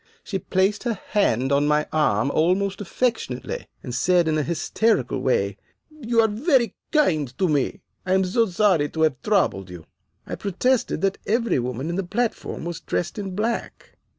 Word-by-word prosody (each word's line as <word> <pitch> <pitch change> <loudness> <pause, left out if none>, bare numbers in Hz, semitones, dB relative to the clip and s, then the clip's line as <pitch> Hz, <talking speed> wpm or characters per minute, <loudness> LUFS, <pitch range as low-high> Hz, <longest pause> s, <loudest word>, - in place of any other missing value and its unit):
She 195 - -3
placed 190 +3 +1
her 230 -5 -1
hand 135 - +2
on 140 +1 +3
my 150 0 +2
arm 140 -5 +2
almost 190 +5 +1
affectionately, 205 - -2 0.2
and 125 - -6
said 175 +6 +3
in 155 - +1
a 155 - +2
hysterical 170 - 0
way, 100 -6 0 0.3
'You 240 -6 +1
are 220 - +4
very 235 - +2 0.2
kind 155 - +1
to 190 - +2
me. 145 -4 0 0.2
I 185 0 +1
am 190 0 +3
so 225 +5 +2
sorry 180 -6 +2
to 160 - -4
have 140 -5 +1
troubled 180 - +1
you.' 85 -3 -10 0.4
"I - - -7
protested 230 +6 0
that 195 0 0
every 230 - +1
woman 125 +3 -3
on 175 - -3
the 195 - 0
platform 225 -2 -3
was 170 -1 -4
dressed 175 +4 -3
in 195 -2 -5
black. 225 +3 -3
185 Hz, 175 wpm, -23 LUFS, 145-215 Hz, 0.4 s, are